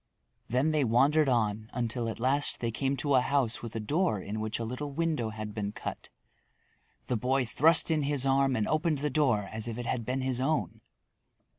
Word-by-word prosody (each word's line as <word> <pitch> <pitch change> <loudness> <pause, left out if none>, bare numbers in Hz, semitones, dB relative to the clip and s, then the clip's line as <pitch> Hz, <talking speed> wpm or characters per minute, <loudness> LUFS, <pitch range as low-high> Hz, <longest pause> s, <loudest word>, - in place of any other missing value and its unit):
Then 130 +7 +2
they 155 -2 +2
wandered 135 +5 +3
on 110 -3 0
until 120 -1 -2
at 110 - -6
last 135 +4 +1
they 115 -1 -1
came 135 +4 -1
to 140 +3 0
a 130 - +5
house 130 -3 0
with 115 -2 -7
a - - -1
door 145 - 0
in 105 +3 -5
which 110 0 -3
a 115 - -4
little 125 +6 -4
window 155 -6 -1
had 110 -1 -6
been 105 -1 -3
cut. - - -7 1.0
The 125 - -1
boy 130 +3 +1
thrust 160 +8 +3
in 155 -1 +2
his 140 -2 +2
arm 135 0 +3
and 110 -3 0
opened 155 0 +1
the 145 +1 -2
door 125 -9 +2
as 110 +1 -3
if 115 -1 -4
it 120 - -5
had 115 - -2
been 130 +4 -2
his 130 -1 0
own. 115 - -1
125 Hz, 205 wpm, -29 LUFS, 110-145 Hz, 1.0 s, a